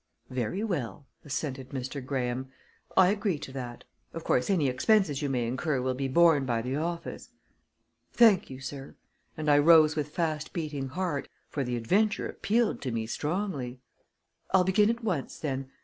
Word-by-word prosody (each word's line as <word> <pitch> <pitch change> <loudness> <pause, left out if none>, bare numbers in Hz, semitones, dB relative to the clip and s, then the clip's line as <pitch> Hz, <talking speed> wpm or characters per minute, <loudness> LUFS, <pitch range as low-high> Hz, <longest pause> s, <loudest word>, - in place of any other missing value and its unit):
"Very 125 - -2
well," 145 - -3 0.2
assented 135 -2 -4
Mr. 135 +1 -5
Graham. 130 -1 -2 0.5
"I 185 -1 +7
agree 205 -4 0
to 145 - -8
that. 125 -3 -7 0.3
Of 165 - -6
course, 125 - +1
any 170 -8 +3
expenses 150 - +2
you 145 - -1
may 125 -3 0
incur 130 +4 -1
will 130 +1 0
be 135 +1 -2
borne 160 +1 +5
by 120 -3 -1
the 130 +2 -2
office." 170 +2 -4 0.8
"Thank 225 -6 +5
you, 130 -1 -8
sir," 135 0 -7 0.4
and 155 -1 -4
I 145 -1 +6
rose 155 0 +6
with 150 -1 -2
fast 155 -1 -2
beating 150 -5 -3
heart, 155 0 -3 0.2
for 140 - -2
the 125 -1 -2
adventure 200 - +1
appealed 225 +2 0
to 130 - -3
me 115 -1 -2
strongly. 145 - -3 0.7
"I'll 190 -1 +4
begin 205 +3 +3
at 235 +1 -2
once 180 -11 -2
then. 135 -3 -3
145 Hz, 165 wpm, -29 LUFS, 130-175 Hz, 0.8 s, I